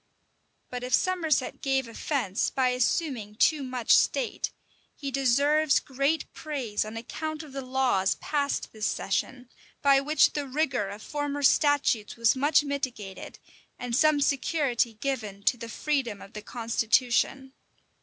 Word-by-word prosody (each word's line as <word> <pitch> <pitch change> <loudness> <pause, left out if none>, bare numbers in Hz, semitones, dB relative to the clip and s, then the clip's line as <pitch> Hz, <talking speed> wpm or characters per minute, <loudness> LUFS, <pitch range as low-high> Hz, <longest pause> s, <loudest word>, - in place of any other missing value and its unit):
[*] - - -45
But 250 0 -5
if 250 - +3
Somerset 330 -8 0
gave 270 -2 0
offence 230 -4 -1
by 260 -1 +1
assuming 250 -3 -1
too 300 +6 +3
much 255 -3 +2
state, - - +1 0.5
he 280 -2 -5
deserves 280 +3 +3
great 275 +4 -1
praise 265 -9 -3
on 215 +1 -7
account 310 +7 -5
of 295 -3 -13
the 275 - -4
laws 255 -7 +1
passed 285 -2 -2
this 215 -2 -2
session, 250 +5 -2 0.4
by 275 -1 +5
which 300 +3 +3
the 290 -2 -3
rigor 265 -7 -1
of 205 +2 -9
former 290 -1 -3
statutes 280 -7 +3
was 230 0 +3
much 290 +3 +3
mitigated, 255 -9 -5 0.4
and 245 -1 -3
some 305 +1 +4
security 275 -5 +1
given 215 -5 -4
to 245 - +3
the 230 -1 -8
freedom 250 -5 -2
of 195 - -13
the 210 - -6
constitution. 245 +4 0
265 Hz, 145 wpm, -27 LUFS, 230-290 Hz, 0.5 s, by